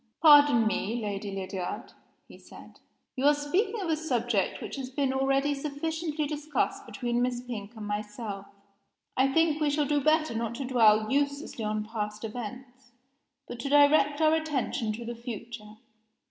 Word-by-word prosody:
"Pardon 290 Hz, -7 st, +7 dB
me, 215 Hz, +1 st, -1 dB
Lady 205 Hz, -2 st, -4 dB
Lydiard," 195 Hz, +2 st, -5 dB, 0.3 s
he -, -, -13 dB
said, -, -, -15 dB, 0.4 s
"you 260 Hz, -, -3 dB
are 295 Hz, -, +6 dB
speaking 385 Hz, +10 st, 0 dB
of 370 Hz, -, -3 dB
a 320 Hz, -, +2 dB
subject 240 Hz, -10 st, -1 dB
which -, -, -6 dB
has 260 Hz, -2 st, -5 dB
been 265 Hz, 0 st, 0 dB
already 270 Hz, +2 st, +1 dB
sufficiently 305 Hz, +2 st, -3 dB
discussed 300 Hz, +1 st, -2 dB
between 240 Hz, -2 st, -2 dB
Miss 245 Hz, -1 st, 0 dB
Pink 235 Hz, -3 st, -7 dB
and 215 Hz, -1 st, -7 dB
myself. 210 Hz, -1 st, -5 dB, 0.7 s
I 265 Hz, +1 st, +3 dB
think 320 Hz, 0 st, +2 dB
we 300 Hz, -, +3 dB
shall 290 Hz, +1 st, +1 dB
do 290 Hz, +1 st, +1 dB
better 310 Hz, -1 st, +2 dB
not 230 Hz, 0 st, -3 dB
to 270 Hz, -, -4 dB
dwell 220 Hz, -3 st, +4 dB
uselessly 280 Hz, -3 st, -1 dB
on 215 Hz, 0 st, -2 dB
past 210 Hz, -1 st, -5 dB
events, 245 Hz, +3 st, -8 dB, 0.5 s
but 240 Hz, -, -8 dB
to 275 Hz, -, -3 dB
direct 290 Hz, 0 st, +5 dB
our 310 Hz, 0 st, +5 dB
attention 295 Hz, -8 st, -1 dB
to 235 Hz, +2 st, -7 dB
the 240 Hz, -, -4 dB
future. 230 Hz, -2 st, -8 dB
255 Hz, 160 wpm, -28 LUFS, 220-290 Hz, 0.7 s, Pardon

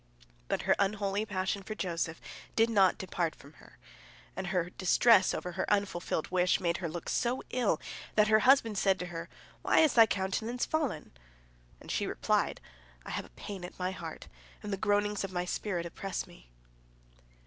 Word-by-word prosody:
But -, -, -1 dB
her -, -, +3 dB
unholy 200 Hz, +1 st, 0 dB
passion 190 Hz, 0 st, -1 dB
for 215 Hz, +3 st, -6 dB
Joseph 165 Hz, -4 st, -2 dB, 0.4 s
did 225 Hz, +1 st, +3 dB
not 195 Hz, -4 st, +4 dB
depart 175 Hz, -3 st, -2 dB
from 140 Hz, +2 st, -16 dB
her, -, -, -18 dB, 0.6 s
and 190 Hz, 0 st, -4 dB
her 180 Hz, -1 st, -1 dB
distress 190 Hz, +2 st, +4 dB
over 180 Hz, -, -4 dB
her 175 Hz, -, -2 dB
unfulfilled 195 Hz, -6 st, -1 dB
wish 180 Hz, 0 st, +3 dB
made 170 Hz, -1 st, 0 dB
her 170 Hz, -3 st, -3 dB
look 170 Hz, +1 st, -6 dB
so 245 Hz, +2 st, 0 dB
ill 235 Hz, -10 st, +1 dB, 0.4 s
that 210 Hz, 0 st, +5 dB
her 215 Hz, 0 st, +5 dB
husband 230 Hz, -4 st, +4 dB
said 195 Hz, -1 st, +3 dB
to 180 Hz, -, -4 dB
her, 165 Hz, -, -6 dB, 0.3 s
"Why -, -, +4 dB
is 315 Hz, -3 st, +4 dB
thy 225 Hz, -2 st, +7 dB
countenance 220 Hz, +5 st, -1 dB
fallen?" 285 Hz, -, -2 dB, 0.7 s
And -, -, -8 dB
she -, -, 0 dB
replied, -, -, 0 dB, 0.5 s
"I -, -, -6 dB
have -, -, -3 dB
a -, -, -16 dB
pain 190 Hz, -, -8 dB
at 180 Hz, -, -8 dB
my 185 Hz, 0 st, -1 dB
heart, 165 Hz, -4 st, -8 dB, 0.4 s
and 210 Hz, -1 st, -3 dB
the -, -, -1 dB
groanings 205 Hz, 0 st, +1 dB
of 195 Hz, -, -4 dB
my 180 Hz, -1 st, -2 dB
spirit 180 Hz, -2 st, -2 dB
oppress 190 Hz, +3 st, -4 dB
me." -, -, -17 dB
195 Hz, 180 wpm, -31 LUFS, 180-215 Hz, 0.7 s, thy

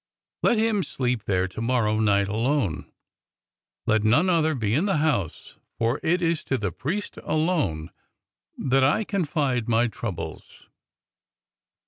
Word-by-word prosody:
Let 235 Hz, -, +3 dB
him 220 Hz, -2 st, +2 dB
sleep 125 Hz, -, -2 dB
there 95 Hz, -2 st, +1 dB
to 95 Hz, +4 st, -7 dB
morrow 115 Hz, -3 st, +1 dB
night 100 Hz, -2 st, +3 dB
alone. 110 Hz, -, -1 dB, 0.9 s
Let 110 Hz, -1 st, +2 dB
none 150 Hz, +13 st, +4 dB
other 160 Hz, -2 st, +2 dB
be 110 Hz, -4 st, -1 dB
in 155 Hz, +10 st, +2 dB
the 195 Hz, -, +1 dB
house, 140 Hz, -, -1 dB, 0.2 s
for 115 Hz, +4 st, 0 dB
it 175 Hz, +2 st, +1 dB
is 165 Hz, -1 st, 0 dB
to 130 Hz, -, 0 dB
the 100 Hz, -5 st, -2 dB
priest 185 Hz, -, -4 dB
alone 150 Hz, -, -1 dB, 0.7 s
that 135 Hz, 0 st, +2 dB
I 145 Hz, +11 st, +3 dB
can 200 Hz, -2 st, -2 dB
confide 130 Hz, -6 st, -1 dB
my 115 Hz, +1 st, +3 dB
trou 115 Hz, -1 st, -4 dB
bles. 85 Hz, -, -9 dB
130 Hz, 145 wpm, -25 LUFS, 110-160 Hz, 0.9 s, none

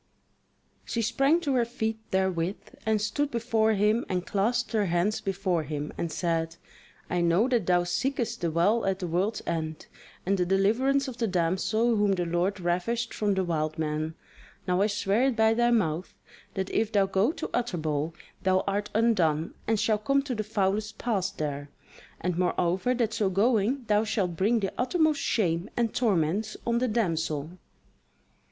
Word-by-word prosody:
She 230 Hz, -, -2 dB
sprang 275 Hz, +9 st, +2 dB
to 285 Hz, -5 st, 0 dB
her 245 Hz, -2 st, +3 dB
feet 225 Hz, -2 st, -3 dB
therewith, 190 Hz, -1 st, -1 dB
and 220 Hz, -1 st, +3 dB
stood 215 Hz, +8 st, -1 dB
before 225 Hz, -3 st, +1 dB
him 215 Hz, +3 st, +2 dB
and 180 Hz, -1 st, -1 dB
clasped 235 Hz, +5 st, 0 dB
her 215 Hz, -4 st, +1 dB
hands 175 Hz, +5 st, 0 dB
before 190 Hz, -3 st, -1 dB
him 150 Hz, 0 st, -5 dB
and 170 Hz, -, -3 dB
said: 165 Hz, -1 st, -1 dB, 0.5 s
"I 175 Hz, -, 0 dB
know 170 Hz, +7 st, +3 dB
that 235 Hz, -8 st, +1 dB
thou 175 Hz, -1 st, +4 dB
seekest 235 Hz, +8 st, -2 dB
the 170 Hz, -, +1 dB
Well 175 Hz, +8 st, +2 dB
at 190 Hz, -1 st, +1 dB
the 190 Hz, -, -4 dB
World's 185 Hz, +6 st, -1 dB
End 160 Hz, -2 st, -3 dB, 0.4 s
and 195 Hz, +1 st, +1 dB
the 180 Hz, -, +2 dB
deliverance 240 Hz, +9 st, +2 dB
of 250 Hz, -3 st, -6 dB
the 230 Hz, -, 0 dB
damsel 190 Hz, +6 st, +1 dB
whom 205 Hz, -1 st, +3 dB
the 180 Hz, -2 st, -1 dB
Lord 175 Hz, +4 st, 0 dB
ravished 185 Hz, +7 st, -1 dB
from 205 Hz, -2 st, 0 dB
the 190 Hz, -, +1 dB
wild 155 Hz, -3 st, -1 dB
man: 155 Hz, 0 st, -2 dB, 0.5 s
now 180 Hz, +1 st, +2 dB
I 205 Hz, -, +4 dB
swear 205 Hz, +3 st, +1 dB
it 270 Hz, -3 st, +1 dB
by 220 Hz, 0 st, +4 dB
thy 240 Hz, +1 st, +2 dB
mouth, 180 Hz, -7 st, 0 dB, 0.4 s
that 190 Hz, -1 st, -2 dB
if 220 Hz, 0 st, 0 dB
thou 200 Hz, -3 st, +3 dB
go 195 Hz, +6 st, +2 dB
to 335 Hz, -, -6 dB
Utterbol 160 Hz, -9 st, -1 dB, 0.3 s
thou 185 Hz, 0 st, +2 dB
art 200 Hz, +1 st, -1 dB
undone 175 Hz, -9 st, +2 dB
and 220 Hz, -1 st, +2 dB
shalt 215 Hz, -1 st, +1 dB
come 275 Hz, +2 st, +3 dB
to 270 Hz, -2 st, -3 dB
the 215 Hz, -2 st, -2 dB
foulest 210 Hz, +1 st, -1 dB
pass 205 Hz, -6 st, 0 dB
there, 145 Hz, -1 st, -4 dB, 0.5 s
and 180 Hz, 0 st, -2 dB
moreover 180 Hz, +6 st, +1 dB
that 230 Hz, -3 st, 0 dB
so 205 Hz, -4 st, +1 dB
going 225 Hz, +6 st, +2 dB
thou 210 Hz, -1 st, +3 dB
shalt 195 Hz, -6 st, -1 dB
bring 215 Hz, +6 st, +2 dB
the 195 Hz, -, -2 dB
uttermost 310 Hz, +2 st, +2 dB
shame 175 Hz, -2 st, 0 dB
and 235 Hz, -2 st, +1 dB
torments 210 Hz, -1 st, 0 dB
on 235 Hz, 0 st, +1 dB
the 255 Hz, -, +1 dB
damsel." 165 Hz, -, -1 dB
200 Hz, 175 wpm, -27 LUFS, 175-230 Hz, 0.5 s, thou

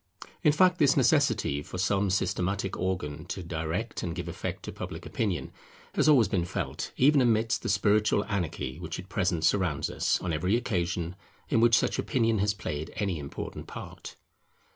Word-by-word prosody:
In 150 Hz, -, +5 dB
fact 180 Hz, +3 st, +4 dB
this 140 Hz, -2 st, +4 dB
necessity 120 Hz, -, +2 dB
for 90 Hz, -, -8 dB
some 100 Hz, +1 st, +1 dB
systematic 95 Hz, +1 st, -1 dB
organ 85 Hz, -4 st, -3 dB
to 90 Hz, +1 st, -5 dB
direct 85 Hz, +7 st, -3 dB
and 85 Hz, -2 st, -3 dB
give 90 Hz, -, -5 dB
effect -, -, -5 dB
to -, -, -5 dB
Public -, -, -7 dB
Opinion, 100 Hz, -7 st, -2 dB, 0.4 s
has -, -, +3 dB
always 125 Hz, -8 st, +6 dB
been 95 Hz, -3 st, 0 dB
felt, 85 Hz, -6 st, -4 dB
even 140 Hz, +1 st, +5 dB
amidst 115 Hz, -2 st, +2 dB
the -, -, -3 dB
spiritual 105 Hz, 0 st, +3 dB
anarchy 85 Hz, -8 st, -3 dB
which 85 Hz, -2 st, -5 dB
at 95 Hz, +2 st, -9 dB
present 90 Hz, -6 st, 0 dB
surrounds 90 Hz, -5 st, +1 dB
us, -, -, +1 dB
on 90 Hz, -2 st, -3 dB
every 90 Hz, +7 st, +1 dB
occasion 90 Hz, -6 st, -1 dB, 0.3 s
in 115 Hz, -, +3 dB
which 115 Hz, -1 st, +6 dB
such -, -, 0 dB
opinion 115 Hz, -4 st, +1 dB
has 105 Hz, +1 st, +1 dB
played 75 Hz, -4 st, -4 dB
any 95 Hz, -6 st, -1 dB
important 70 Hz, -1 st, -7 dB
part. -, -, -9 dB
95 Hz, 170 wpm, -28 LUFS, 85-115 Hz, 0.4 s, always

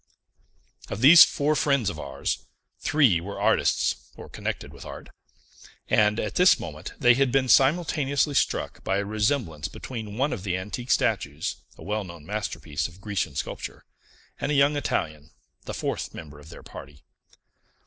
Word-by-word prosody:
Of 100 Hz, -, -5 dB
these 160 Hz, +6 st, +10 dB
four 150 Hz, +2 st, +1 dB
friends 140 Hz, -7 st, +1 dB
of 75 Hz, -, -9 dB
ours, 70 Hz, -1 st, -4 dB, 0.3 s
three 135 Hz, -, +3 dB
were 100 Hz, +3 st, -7 dB
artists, -, -, +1 dB
or -, -, -11 dB
connected -, -, -5 dB
with -, -, -11 dB
art; -, -, -9 dB, 0.8 s
and, 105 Hz, +1 st, +3 dB
at 105 Hz, -, -3 dB
this 180 Hz, +1 st, +5 dB
moment, 75 Hz, -2 st, -7 dB
they 125 Hz, 0 st, +5 dB
had 135 Hz, +1 st, +2 dB
been 135 Hz, 0 st, +2 dB
simultaneously 145 Hz, 0 st, +3 dB
struck -, -, -1 dB
by 95 Hz, -, 0 dB
a 100 Hz, -, -1 dB
resemblance 105 Hz, -, -1 dB
between 110 Hz, +1 st, -7 dB
one 140 Hz, +3 st, +1 dB
of 115 Hz, -, -5 dB
the 90 Hz, -1 st, -2 dB
antique 105 Hz, +7 st, -6 dB
statues, 70 Hz, +2 st, 0 dB, 0.2 s
a -, -, -12 dB
well 105 Hz, +2 st, -2 dB
known 85 Hz, -4 st, -11 dB
masterpiece 85 Hz, -6 st, -3 dB
of 85 Hz, +2 st, -16 dB
Grecian 95 Hz, -8 st, -3 dB
sculpture, -, -, -6 dB, 0.5 s
and 140 Hz, -, -1 dB
a -, -, +1 dB
young 140 Hz, +1 st, +4 dB
Italian, 75 Hz, -, -2 dB, 0.4 s
the -, -, -5 dB
fourth -, -, -3 dB
member 75 Hz, -2 st, -10 dB
of 75 Hz, +1 st, -14 dB
their -, -, -12 dB
party. 70 Hz, 0 st, -12 dB
105 Hz, 160 wpm, -25 LUFS, 80-135 Hz, 0.8 s, these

